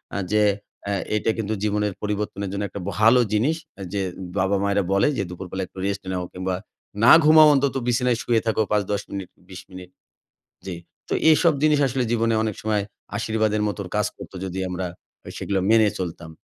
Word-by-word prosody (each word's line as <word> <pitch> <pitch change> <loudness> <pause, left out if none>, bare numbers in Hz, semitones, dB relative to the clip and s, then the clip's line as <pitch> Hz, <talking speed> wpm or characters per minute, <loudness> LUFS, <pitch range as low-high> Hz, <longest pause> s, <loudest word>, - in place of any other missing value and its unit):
আ - - -1
যে 105 0 +3 0.5
আ - - 0 0.2
এটা 105 +1 +1
কিন্তু 110 -1 -2
জীবনের 105 -1 0
পরিবর্তনের 105 -1 -3
জন্য 100 +1 -3
একটা 100 - -7 0.2
ভালো 115 +4 +6
জিনিস 130 +10 +2 0.4
যে 100 - 0 0.4
বাবা-মায়েরা 100 +1 +1
বলে 100 0 +3
যে 100 - 0
দুপুরবেলা 95 +1 -6
একটু - - -21
রেস্ট 100 0 -2
নাও, 90 -1 -2
কিংবা 95 0 -2 0.5
না 120 - +8
ঘুমাও 155 0 +8
অন্তত 140 -1 +1
বিছানায় 125 0 +2
শুয়ে 115 -2 +2
থাকো 110 0 +2
৫-১০ 105 -1 0
মিনিট 100 -2 -5 0.2
২০ 90 -1 -9
মিনিট 90 -1 -10 0.8
জি। 95 - -4 0.3
তো - - -1 0.2
এসব 165 +1 +5
জিনিস 150 -1 +4
আসলে 130 0 -1
জীবনে 115 -1 +1
অনেক 110 -2 -2
সময় 105 -1 0 0.3
আশীর্বাদের 110 -1 0
মতো 105 - -4 0.2
কাজ 105 0 +2
করত - - -11
যদি 95 0 -5
আমরা 90 0 -3 0.4
আ - - -7
সেগুলা 100 -1 -1
মেনে 110 -1 +5
চলতাম। 85 -2 -5
105 Hz, 175 wpm, -23 LUFS, 95-115 Hz, 0.8 s, না